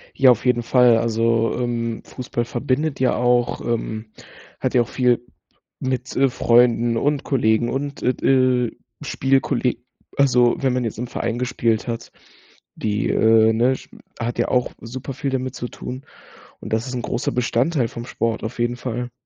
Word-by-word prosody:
Ja, 135 -2 +6
auf 120 - +2
jeden 125 -2 +2
Fall, 120 -1 +5
also, 115 0 +1
ähm, 115 -2 -2
Fußball 120 -2 -4
verbindet 140 +4 -1
ja 130 -2 +3
auch, 125 0 +1
ähm, 110 -1 -3 0.5
hat - - -2
ja 120 - +5
auch - - -7
viel 125 -2 +1 0.5
mit, 130 -1 -3
äh, 135 0 +4
Freunden 120 -1 +3
und 145 +3 0
Kollegen 120 -3 +1
und 140 +1 -4
et 125 - 0
äh, 130 -3 +3 0.3
Spielkolleg 130 -2 0 0.3
also, 125 -3 +4
wenn 135 -2 +1
man 125 -1 -1
jetzt 110 - -4
im 125 - -3
Verein 120 -1 -3
gespielt 120 -3 0
hat, 115 -1 -4 0.6
die, 105 -1 -1
äh, 110 0 +5
ne, 120 +4 +3
Sp - - -16 0.2
hat 120 0 -3
ja - - +1
auch 125 -1 +1
super 125 +3 -6
viel 140 - -3
damit 130 -1 -2
zu 120 - -5
tun 130 +3 -8 0.6
und - - -8
das 115 +4 0
ist 125 - -4
'n 125 - -2
großer 120 - -2
Bestandteil 125 +2 +1
vom 120 -1 -7
Sport 115 -2 -2
auf 115 +2 -5
jeden 120 +1 0
Fall. 125 0 -4
120 Hz, 170 wpm, -21 LUFS, 115-130 Hz, 0.6 s, Ja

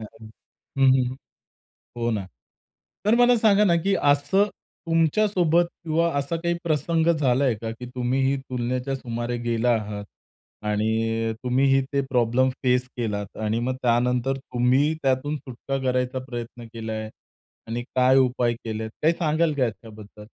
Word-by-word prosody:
हं, 110 - -7 0.7
हं, 135 -1 +6
हं. 130 -1 +1 0.8
हो 120 0 0
ना. 105 -4 -2 0.8
तर 215 +2 +4
मला 245 0 +5
सांगा 210 -2 +4
ना, 175 -5 +4
की 195 - +2
असं 145 +8 +3 0.4
तुमच्या 165 +5 +3
सोबत 175 -3 +3 0.2
किंवा 165 +1 +1
असा 140 +4 -3
काही 170 0 +1
प्रसंग 160 +1 +1
झालाय 130 -3 +2
का, 115 -1 -3
की 115 +2 -8
तुम्ही 125 +1 0
ही 135 +1 +2
तुलनेच्या 125 +1 -3
सुमारे 120 -1 -4
गेला 120 +1 +1
आहात. 105 -1 -6 0.6
आणि 110 +1 0
तुम्हीही 135 +2 +3
ते 140 - +2
प्रॉब्लेम 125 +1 +2
फेस 125 0 +2
केलात. 105 -4 -3
आणि 110 +2 0
मग 130 +2 -1
त्यानंतर 125 +2 +1
तुम्ही 130 +3 +1
त्यातून 135 +3 0
सुटका 135 0 -5
करायचा 125 0 0
प्रयत्न 120 -1 -7
केलाय. 110 -1 -5 0.6
आणि 120 +2 -3
काय 130 +1 +5
उपाय 125 -2 +2
केलेत. 110 0 -4
काही 160 +2 +4
सांगाल 155 -1 +1
का 135 - +3
याच्याबद्दल? 110 -2 -9
125 Hz, 145 wpm, -24 LUFS, 115-145 Hz, 0.8 s, हं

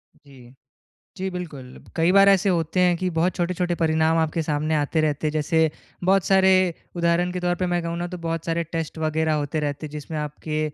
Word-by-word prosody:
जी। 130 -4 -17 0.6
जी, 190 0 -3
बिल्कुल। 150 -8 -8 0.2
कई 165 +1 +3
बार 195 0 +7
ऐसे 195 0 +4
होते 170 0 0
हैं 180 -1 +4
कि 185 +2 -2
बहुत 170 +3 +1
छोटे-छोटे 175 0 -1
परिणाम 160 -1 +2
आपके 160 0 0
सामने 155 0 -1
आते 150 +1 +1
रहते 155 -1 0
हैं। 150 - -1
जैसे 160 +1 +2 0.3
बहुत 190 0 +3
सारे 190 0 +4 0.4
उदाहरण 170 +1 +1
के 180 - -3
तौर 175 0 +1
पे - - +2
मैं 175 0 0
कहूँ 170 0 -3
ना, 175 - -2
तो 180 0 -7
बहुत 165 0 -2
सारे 165 0 0
टेस्ट 165 0 -5
वग़ैरह 160 0 0
होते 145 +2 -2
रहते 145 +1 -3
हैं। - - -10
जिसमें 150 +1 -6
आपके 150 +1 -4
165 Hz, 205 wpm, -23 LUFS, 155-180 Hz, 0.6 s, बार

